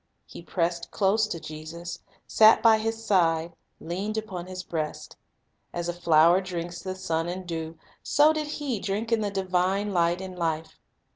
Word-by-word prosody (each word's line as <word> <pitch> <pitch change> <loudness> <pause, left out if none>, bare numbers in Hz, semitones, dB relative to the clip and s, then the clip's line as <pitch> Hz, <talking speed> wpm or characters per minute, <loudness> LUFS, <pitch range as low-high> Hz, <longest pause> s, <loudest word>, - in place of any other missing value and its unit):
He - - -11
pressed 170 0 -2
close 210 +2 +2
to 170 - -4
Jesus, 155 +3 -7
Fellowship; - - -34
sat 220 0 +6
by 225 -1 +6
His 225 +1 -3
side, 170 -4 +2 0.3
leaned 195 +6 -4
upon 190 -5 -5
His 185 0 -6
breast. 155 -3 -4 0.6
As 175 0 -3
a 175 - -1
flower 170 +1 +4
the 175 0 -5
sun 165 -3 -2
and 185 +1 -5
dew, 165 -1 -5 0.2
so 300 +2 +4
did 305 -1 -2
he 290 -6 -3
drink 210 +4 -3
in 230 -1 +3
the 205 - 0
divine 195 +1 0
light 170 0 +2
and 190 -1 -7
life. 160 -2 -3
180 Hz, 165 wpm, -26 LUFS, 170-210 Hz, 0.6 s, sat